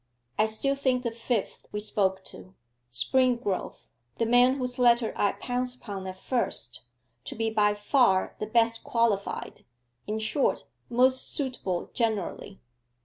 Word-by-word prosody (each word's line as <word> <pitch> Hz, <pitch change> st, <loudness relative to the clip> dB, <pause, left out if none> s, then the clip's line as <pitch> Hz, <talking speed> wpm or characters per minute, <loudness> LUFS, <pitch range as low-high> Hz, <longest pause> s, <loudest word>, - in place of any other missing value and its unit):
'I 215 Hz, -, +4 dB
still 220 Hz, +6 st, 0 dB
think 260 Hz, -2 st, 0 dB
the 235 Hz, -, -1 dB
fifth 230 Hz, -1 st, -3 dB
we 210 Hz, -, -3 dB
spoke 190 Hz, -2 st, 0 dB
to, 185 Hz, 0 st, -12 dB, 0.4 s
Springrove, 235 Hz, -, +1 dB, 0.4 s
the 230 Hz, -, +1 dB
man 245 Hz, +3 st, +5 dB
whose 250 Hz, -2 st, -3 dB
letter 240 Hz, -2 st, +4 dB
I 205 Hz, -, +2 dB
pounced 250 Hz, 0 st, -3 dB
upon 195 Hz, -5 st, -7 dB
at 185 Hz, 0 st, -6 dB
first, 125 Hz, -, -2 dB, 0.4 s
to -, -, -4 dB
be 225 Hz, 0 st, -1 dB
by 210 Hz, -1 st, +3 dB
far 205 Hz, -2 st, +2 dB
the 215 Hz, -, -3 dB
best 230 Hz, +1 st, +3 dB
qualified, 230 Hz, -4 st, -1 dB, 0.4 s
in 215 Hz, +1 st, -2 dB
short, 220 Hz, +6 st, +1 dB, 0.3 s
most 255 Hz, +2 st, +3 dB
suitable 250 Hz, -, -3 dB
generally. 210 Hz, -3 st, -2 dB
230 Hz, 140 wpm, -27 LUFS, 205-250 Hz, 0.4 s, man